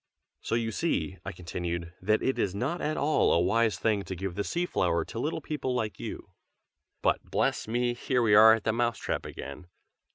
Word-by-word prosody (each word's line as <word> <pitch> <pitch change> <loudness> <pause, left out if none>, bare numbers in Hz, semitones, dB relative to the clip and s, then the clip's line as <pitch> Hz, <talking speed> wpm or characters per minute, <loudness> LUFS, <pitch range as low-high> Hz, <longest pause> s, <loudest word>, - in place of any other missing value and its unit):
"So - - -1
you 115 -1 0
see," 110 - -1
I - - -4
continued, 85 0 -5
"that 110 +3 +2
it 130 - 0
is 100 -1 0
not 140 +11 -2
at 155 - -1
all 150 +2 +3
a - - +4
wise 110 +5 +2
thing 110 -3 +1
to 95 - -5
give 95 +1 -4
the 100 +3 -2
sea 175 +9 -1
flower 85 - 0
to 115 - -6
little 150 +6 -2
people 140 -4 -3
like 110 -4 -2
you. - - -7 0.7
But, - - +2
bless - - 0
me! 120 +2 0
here 125 0 0
we 110 -2 +4
are 110 +2 +9
at 115 - -6
the 115 - +1
Mouse 120 -1 0
trap - - -3
again. 70 +6 -8
110 Hz, 205 wpm, -29 LUFS, 95-125 Hz, 0.7 s, are